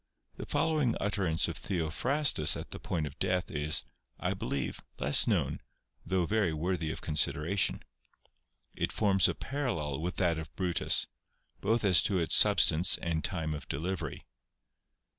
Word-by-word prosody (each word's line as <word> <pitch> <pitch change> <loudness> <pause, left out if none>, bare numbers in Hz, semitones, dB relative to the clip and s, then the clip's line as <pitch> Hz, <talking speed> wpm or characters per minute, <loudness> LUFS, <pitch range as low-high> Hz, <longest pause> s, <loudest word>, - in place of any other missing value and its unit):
The - - -7
following 155 -7 +1
utterance 95 -6 +1
of - - -5
Theophrastus 95 - +1
at - - -8
the - - -7
point 80 -3 -2
of 70 - -9
death 90 -1 -1
is, 75 +1 +2 0.3
I - - -1
believe, 70 -2 -4 0.2
less 70 +2 +4
known, - - 0 0.4
though 95 -2 0
very 105 -3 +1
worthy 80 0 -2
of - - -7
con 75 - -4
sideration. 75 +5 0 0.9
It - - -2
forms 95 -4 +3
a - - -2
parallel 95 - -3
with 90 +3 -3
that 85 -3 +1
of 80 - -9
Brutus, 90 -3 +2 0.5
both 115 +3 0
as 90 -4 +5
to 100 - +1
its 85 -3 0
substance 85 +4 +5
and 80 -1 -2
time 80 -4 -2
of 75 - -7
delivery. 85 +6 -4
85 Hz, 150 wpm, -30 LUFS, 80-100 Hz, 0.9 s, as